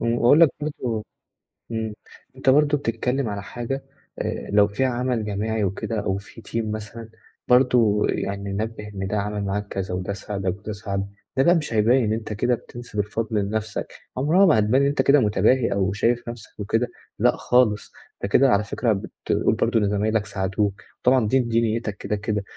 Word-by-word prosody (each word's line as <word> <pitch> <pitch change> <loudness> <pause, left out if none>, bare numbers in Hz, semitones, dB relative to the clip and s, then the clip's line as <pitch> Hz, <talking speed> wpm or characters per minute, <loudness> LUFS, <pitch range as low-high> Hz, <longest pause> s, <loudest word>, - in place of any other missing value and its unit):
وأقول 120 +5 +4
لك 165 - +8
برضه، 125 -7 -3 0.7
إمم 110 -1 -2 0.4
أنت 130 0 +1
برضه 145 +2 +4
بتتكلم 125 0 -1
على 100 -1 -4
حاجة 120 +6 -5 0.4
آآ، - - -4
لو 105 0 +6
فيها 120 +6 0
عمل 125 -2 -1
جماعي 105 +1 -1
وكده 100 +3 -2
أو 95 -1 -1
في 105 +3 -12
team 115 0 -3
مثلًا 110 +1 -7 0.4
برضه 125 -4 +4
يعني 100 0 -2
نبِّه 105 +1 -4
إن 95 -2 -5
ده 105 - -1
عمل 105 0 -2
معاك 100 +1 -2
كذا، 95 -2 -4
وده 90 +2 -3
ساعدك 95 -1 -3
وده 110 +1 -6
ساعدك، 100 -1 -3 0.3
ده 135 - +5
بقى 175 +1 +5
مش 150 -7 -2
هيبيِّن 110 +1 +3
أنت 110 -1 -4
كده 120 +3 +1
بتنسب 120 -3 -8
الفضل 110 +2 -2
لنفسك، 105 +1 -3 0.2
عمرها 165 +9 +4
ما 150 - +5
هتبان 115 +6 +3
إن 140 - +3
أنت 140 -1 +1
كده 140 +2 +5
متباهي 110 +3 +2
أو 95 -1 +1
شايف 120 +3 0
نفسك 115 -2 -10
وكده، 115 +4 0 0.3
لأ - - +4
خالص، 120 -4 +2 0.3
ده - - +1
كده 130 +6 +4
على 105 -2 +3
فكرة 110 +2 0
بت 95 - -5 0.2
بتقول - - +2
برضه 115 - +2
إن 105 - +1
زمايلك 105 +1 +1
ساعدوك، 100 0 -1 0.2
وطبعًا 125 -3 +3
دي 130 +5 +3
دي 115 -2 +1
نيّتك 110 -2 -1
كده، 105 - -2
كده 105 -1 -2
110 Hz, 185 wpm, -23 LUFS, 105-125 Hz, 0.7 s, لك